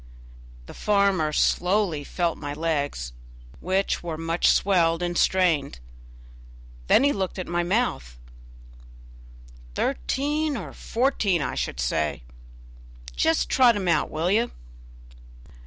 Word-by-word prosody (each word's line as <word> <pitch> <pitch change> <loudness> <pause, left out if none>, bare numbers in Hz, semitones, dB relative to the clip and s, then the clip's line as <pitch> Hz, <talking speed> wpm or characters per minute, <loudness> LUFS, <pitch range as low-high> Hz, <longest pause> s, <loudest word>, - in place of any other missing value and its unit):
The - - -11
farmer 200 -6 +1
slowly 180 -1 +1
felt 170 +3 -1
my 145 -1 -6
legs, 145 - -2 0.5
which 190 +2 -1
were 165 -2 -5
much 165 +1 0
swelled 175 -3 +3
and 175 0 -2
strained; 170 - +2 1.1
then - - +5
he 285 0 +3
looked 190 -2 -3
at 185 - -4
my 175 0 -1
mouth. 170 - -1 1.6
"Thirteen 290 - -1
or 200 - -7
fourteen, 225 - 0
I - - -3
should - - -3
say; 70 +2 -1 0.9
just 160 - +2
trot 245 -3 +4
him 195 -3 -3
out, 165 -3 +2
will 165 +4 -1
you?" 230 +4 +2
175 Hz, 115 wpm, -25 LUFS, 155-200 Hz, 1.6 s, then